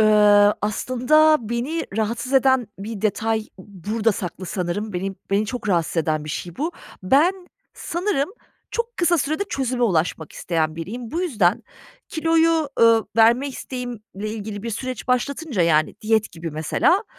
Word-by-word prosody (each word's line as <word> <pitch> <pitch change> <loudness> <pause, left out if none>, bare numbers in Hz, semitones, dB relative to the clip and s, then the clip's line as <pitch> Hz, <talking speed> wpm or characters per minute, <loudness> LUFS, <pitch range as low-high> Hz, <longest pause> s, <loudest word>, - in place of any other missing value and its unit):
ııı, 210 -1 +6
aslında 255 +8 +3
beni 255 +8 -2
rahatsız 230 +4 -2
eden 260 -2 +4
bir 210 +1 -6
detay 220 +1 0 0.2
burada 205 +4 -2
saklı 185 -1 -6
sanırım. 190 +3 -3
Beni 190 +2 -3 0.2
beni 205 +2 +2
çok 245 -2 -5
rahatsız 170 -3 0
eden 155 -1 0
bir 155 - -5
şey 175 +2 -5
bu. 320 +4 -2 0.3
Ben 285 - +4 0.4
sanırım 345 -4 -1 0.4
çok 470 0 -3
kısa 345 -1 +3
sürede 310 +7 -1
çözüme 260 -8 -2
ulaşmak 165 -6 0
isteyen 160 -2 -1
biriyim. 225 +8 -6
Bu 335 - -2
yüzden 230 - +1 0.5
kiloyu, 325 -1 +2
ııı, 230 -1 +5
verme 235 +5 +5
isteğimle 250 -3 -6 0.3
ilgili 210 -1 -6
bir 230 - -4
süreç 255 +2 -5
başlatınca 260 - 0
yani 155 -2 +2
diyet 220 0 +1
gibi 165 -1 -6
mesela 160 - +1
225 Hz, 145 wpm, -22 LUFS, 195-270 Hz, 0.5 s, ııı